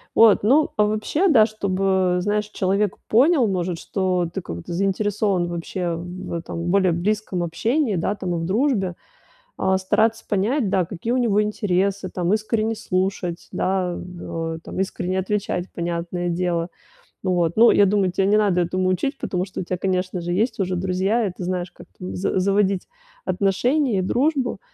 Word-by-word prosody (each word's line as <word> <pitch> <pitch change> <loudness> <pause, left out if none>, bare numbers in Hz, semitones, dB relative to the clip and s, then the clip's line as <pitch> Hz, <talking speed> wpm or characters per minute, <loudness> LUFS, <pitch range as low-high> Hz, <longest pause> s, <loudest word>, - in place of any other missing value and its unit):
Вот, 220 -3 +6
ну, 285 +8 +4
а 210 - +4
вообще, 215 - 0
да, 230 -9 +6
чтобы, 190 -3 0
знаешь, 210 +2 0
человек 200 0 0
понял, 265 +2 +4
может, 180 -3 -1
что 185 -3 -1
ты 195 - -3
как-то 85 - -7
заинтересован 195 0 0
вообще 175 0 -3
в 175 +2 -7
этом, 170 0 -4
более 190 -2 +3
близком 185 +1 -1
общении, 225 - 0
да, 180 +4 -1
там, 185 -3 -3
и - - -1
в 165 - -3
дружбе, 200 - +1 0.6
а, 190 0 +2
стараться 220 +4 +1
понять, 215 +4 +1
да, 185 -2 +2
какие 195 +6 -4
у 250 - +2
него 220 -4 +2
интересы, 200 -2 0
там, 180 +1 0
искренне 220 +1 0
слушать, 185 -3 -2
да, 185 -2 0
в 165 -2 -5
о, - - -11
там, - - -6
искренне 185 -1 -1
отвечать, 190 -2 -2
понятное 175 +1 -3
дело. 170 -1 -1 0.5
Ну 185 -1 +1
вот, 170 -2 +1
ну, 235 +1 +7
я 200 -1 +5
думаю, 195 -2 +2
тя 195 - 0
не 205 +2 +4
надо 195 -4 +2
этому 185 +2 0
учить, 270 +10 0
потому 180 -7 -2
что 190 - -6
у - - -3
тя, 180 +1 -3
конечно 185 -1 -1
же, 175 +1 -3
есть 220 +5 0
уже 185 -1 0
друзья, 190 +5 0
и 195 - -2
ты - - -6
знаешь, 180 0 -3
как - - -15
там 95 +1 -6
з 95 - 0
заводить 195 0 +1 0.4
отношения 215 - +1
и - - +2
дружбу. 260 - 0
190 Hz, 175 wpm, -22 LUFS, 180-210 Hz, 0.6 s, ну